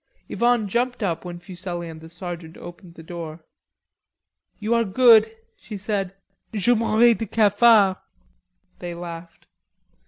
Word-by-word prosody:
Yvonne 240 -3 +1
jumped 245 +3 -1
up 170 -5 -2
when 175 -1 -7
Fuselli 175 -1 -7
and 160 -1 -10
the 160 - -12
sergeant 170 -1 -8
opened 175 0 -12
the 160 - -12
door. 160 -1 -8 1.1
"You 220 +2 -1
are 235 0 +3
good," 220 +1 +5 0.3
she 210 - -9
said. 195 -1 -3 0.4
"Je 220 +2 +2
mourrais 230 +1 +4
de 225 0 -5
cafard." 210 -2 +4 0.8
They 175 -1 -6
laughed. 170 -1 -9
190 Hz, 130 wpm, -23 LUFS, 175-225 Hz, 1.1 s, good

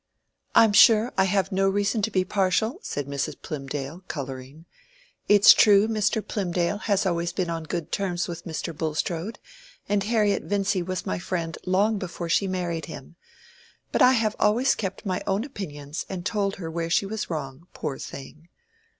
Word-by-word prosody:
"I - - +8
am 220 -2 +3
sure 225 +3 +6
I 190 - +3
have 195 +1 0
no 195 0 +2
reason 205 +2 0
to 205 - 0
be 185 -3 +1
partial," 200 - 0
said 145 - -4
Mrs. 140 0 -4
Plymdale, 145 +2 -6
coloring. 135 +2 -7 0.6
"It's 205 -1 +9
true 205 0 +5
Mr. 215 -1 0
Plymdale 180 -1 -1
has 200 -1 +1
always 170 -1 0
been 180 -1 -2
on 165 -1 -4
good 170 0 -4
terms 180 -4 -1
with 170 -1 -6
Mr. 165 0 -4
Bulstrode, 165 +6 -3 0.5
and 200 -1 +1
Harriet 210 -2 +1
Vincy 195 -1 0
was 185 +1 -4
my 90 - -2
friend 165 - -3
long 200 +3 +2
before 175 -2 -5
she 180 +4 +2
married 175 -3 -2
him. - - -10 0.8
But - - 0
I 255 - +7
have 220 -3 +1
always 235 +6 +3
kept 195 -1 -5
my 185 -2 -1
own 195 +3 +1
opinions 155 - -6
and 185 -2 -5
told 200 -2 0
her 165 -4 -6
where 165 0 -3
she 175 - +2
was 215 +2 -4
wrong, 150 0 -5
poor 135 -2 -5
thing. 155 +4 -10
185 Hz, 175 wpm, -25 LUFS, 165-205 Hz, 0.8 s, It's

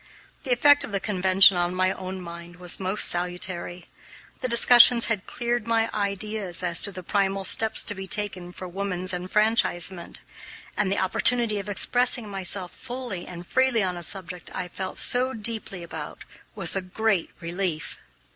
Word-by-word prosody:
The 260 - -3
effect 290 +4 +5
of - - -7
the 200 - -1
convention 190 -1 +4
on 175 +1 -1
my 185 0 +1
own 185 0 -7
mind 170 0 -10
was 180 -1 -1
most 190 +2 +1
salutary. 175 0 -4 0.5
The - - -3
discussions 240 0 +6
had 210 -4 -3
cleared 240 -1 -3
my 225 0 +1
ideas 200 -2 -3
as 170 -2 +4
to 200 - +7
the 185 -1 -9
primal 195 +1 -1
steps 220 +3 +3
to 205 - +1
be 190 -1 -8
taken 190 -3 -1
for 185 +1 -8
woman's 185 0 -4
enfranchisement, 185 -2 -1 0.6
and 200 -2 -1
the 200 - -1
opportunity 215 +3 +1
of 200 +1 -7
expressing 245 +3 +4
myself 190 -2 -3
fully 245 -8 -7
and 175 -1 -9
freely 260 0 +1
on 180 -1 -2
a 175 - -7
subject 180 0 -2
I 180 - -4
felt 190 0 -6
so 255 +1 +1
deeply 215 -4 0
about 160 -3 -9 0.3
was 195 -4 +2
a 195 - -1
great 195 0 -1
relief. 170 -2 -4
195 Hz, 165 wpm, -24 LUFS, 180-220 Hz, 0.6 s, to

